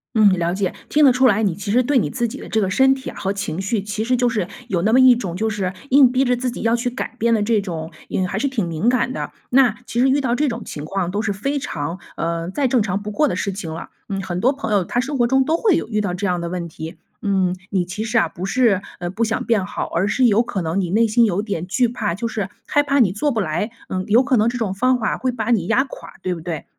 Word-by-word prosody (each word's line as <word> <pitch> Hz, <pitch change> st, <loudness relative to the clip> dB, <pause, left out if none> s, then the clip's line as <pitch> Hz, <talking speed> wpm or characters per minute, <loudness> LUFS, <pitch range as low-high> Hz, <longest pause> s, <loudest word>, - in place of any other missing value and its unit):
嗯， 210 Hz, -3 st, +6 dB
了 170 Hz, 0 st, 0 dB
解， 190 Hz, -1 st, -1 dB, 0.2 s
听 300 Hz, 0 st, +4 dB
得 255 Hz, -, +6 dB
出 260 Hz, +1 st, +3 dB
来， 215 Hz, -2 st, +4 dB
你 190 Hz, -6 st, +1 dB
其 200 Hz, 0 st, -4 dB
实 250 Hz, +3 st, +4 dB
对 275 Hz, +1 st, +2 dB
你 170 Hz, -11 st, +1 dB
自 235 Hz, +8 st, -1 dB
己 -, -, -7 dB
的 -, -, -9 dB
这 220 Hz, -, +1 dB
个 190 Hz, -3 st, +1 dB
身 265 Hz, +7 st, +4 dB
体 265 Hz, -1 st, -6 dB
啊 -, -, -10 dB
和 195 Hz, -, -1 dB
情 195 Hz, -3 st, -3 dB
绪， 200 Hz, +1 st, -1 dB
其 210 Hz, +2 st, -3 dB
实 250 Hz, +2 st, +1 dB
就 245 Hz, 0 st, +2 dB
是 215 Hz, -5 st, -1 dB, 0.2 s
有 180 Hz, -5 st, 0 dB
那 215 Hz, +4 st, +2 dB
么 255 Hz, -, +5 dB
一 255 Hz, -1 st, +7 dB
种 185 Hz, -7 st, -4 dB
就 220 Hz, +1 st, 0 dB
是 195 Hz, -3 st, -2 dB, 0.2 s
硬 265 Hz, -2 st, +6 dB
逼 260 Hz, +1 st, +2 dB
着 250 Hz, 0 st, +2 dB
自 250 Hz, 0 st, -2 dB
己 -, -, -7 dB
要 230 Hz, +1 st, +3 dB
去 245 Hz, +1 st, -1 dB
改 250 Hz, -1 st, -5 dB
变 235 Hz, 0 st, +2 dB
的 215 Hz, -, +2 dB
这 215 Hz, -1 st, +2 dB
种， 165 Hz, -4 st, -5 dB, 0.2 s
嗯， 185 Hz, -1 st, 0 dB
还 190 Hz, -, -3 dB
是 280 Hz, +5 st, 0 dB
挺 220 Hz, -10 st, -1 dB
敏 165 Hz, +8 st, 0 dB
感 255 Hz, 0 st, +1 dB
的。 -, -, -4 dB, 0.2 s
那 250 Hz, -3 st, +5 dB
其 240 Hz, -, -1 dB
实 265 Hz, -, +4 dB
遇 280 Hz, +2 st, +3 dB
到 245 Hz, -3 st, 0 dB
这 290 Hz, 0 st, +1 dB
种 230 Hz, -1 st, -5 dB
情 150 Hz, -, -7 dB
况 180 Hz, +1 st, -2 dB
都 205 Hz, +2 st, -1 dB
是 205 Hz, -2 st, -1 dB
非 275 Hz, +9 st, -2 dB
常 165 Hz, -, -4 dB, 0.2 s
呃， 165 Hz, +1 st, -2 dB
再 275 Hz, +4 st, +1 dB
正 240 Hz, -3 st, +2 dB
常 200 Hz, 0 st, -2 dB
不 210 Hz, -, -5 dB
过 290 Hz, +6 st, +1 dB
的 -, -, -2 dB
事 200 Hz, -2 st, -2 dB
情 170 Hz, -5 st, -6 dB
了， 165 Hz, -, -7 dB, 0.2 s
嗯， 195 Hz, -1 st, -2 dB
很 180 Hz, -1 st, -4 dB
多 260 Hz, -, +4 dB
朋 275 Hz, -6 st, -3 dB
友 195 Hz, -3 st, +3 dB
他 240 Hz, -, -2 dB
生 275 Hz, +2 st, -2 dB
活 240 Hz, -1 st, +3 dB
中 265 Hz, +1 st, +3 dB
都 320 Hz, +2 st, +2 dB
会 385 Hz, -1 st, +3 dB
有 -, -, -3 dB
遇 215 Hz, -2 st, 0 dB
到 190 Hz, -4 st, -2 dB
这 200 Hz, +2 st, -2 dB
样 180 Hz, -1 st, 0 dB
的 170 Hz, -, -3 dB
问 175 Hz, -1 st, -4 dB
题。 160 Hz, +2 st, -8 dB, 0.2 s
嗯， 190 Hz, -3 st, +1 dB
你 185 Hz, -3 st, 0 dB
其 190 Hz, +5 st, -4 dB
实 220 Hz, -, 0 dB
啊， 170 Hz, -, +4 dB
不 175 Hz, +3 st, -6 dB
是 215 Hz, -4 st, +2 dB, 0.2 s
呃， 175 Hz, 0 st, -3 dB
不 220 Hz, +5 st, -2 dB
想 220 Hz, 0 st, -1 dB
变 215 Hz, -5 st, +1 dB
好， -, -, -4 dB
而 190 Hz, +5 st, +1 dB
是 255 Hz, +4 st, +2 dB
有 225 Hz, +1 st, +4 dB
可 195 Hz, -5 st, -3 dB
能 170 Hz, +4 st, -1 dB
你 175 Hz, -, -2 dB
内 225 Hz, +4 st, +3 dB
心 230 Hz, +2 st, +3 dB
有 200 Hz, -2 st, +2 dB
点 200 Hz, -6 st, -3 dB
惧 235 Hz, +6 st, +2 dB
怕， 215 Hz, -7 st, -2 dB
就 230 Hz, +3 st, -3 dB
是 205 Hz, -4 st, -3 dB, 0.2 s
害 290 Hz, -1 st, +2 dB
怕 280 Hz, -1 st, +1 dB
你 190 Hz, -6 st, +4 dB
做 290 Hz, +7 st, 0 dB
不 225 Hz, -, -1 dB
来， 175 Hz, +4 st, -1 dB, 0.2 s
嗯， 185 Hz, 0 st, -2 dB
有 235 Hz, +5 st, +5 dB
可 270 Hz, -1 st, +2 dB
能 225 Hz, +1 st, +3 dB
这 245 Hz, -, -4 dB
种 210 Hz, -5 st, -1 dB
方 255 Hz, +5 st, +2 dB
法 215 Hz, -, -1 dB
会 255 Hz, -1 st, -1 dB
把 230 Hz, -1 st, -2 dB
你 190 Hz, -6 st, +2 dB
压 255 Hz, +4 st, +3 dB
垮， -, -, -11 dB
对 185 Hz, -, -1 dB
不 165 Hz, -, -7 dB
对？ 165 Hz, -3 st, -5 dB
215 Hz, 320 characters per minute, -20 LUFS, 185-245 Hz, 0.2 s, 一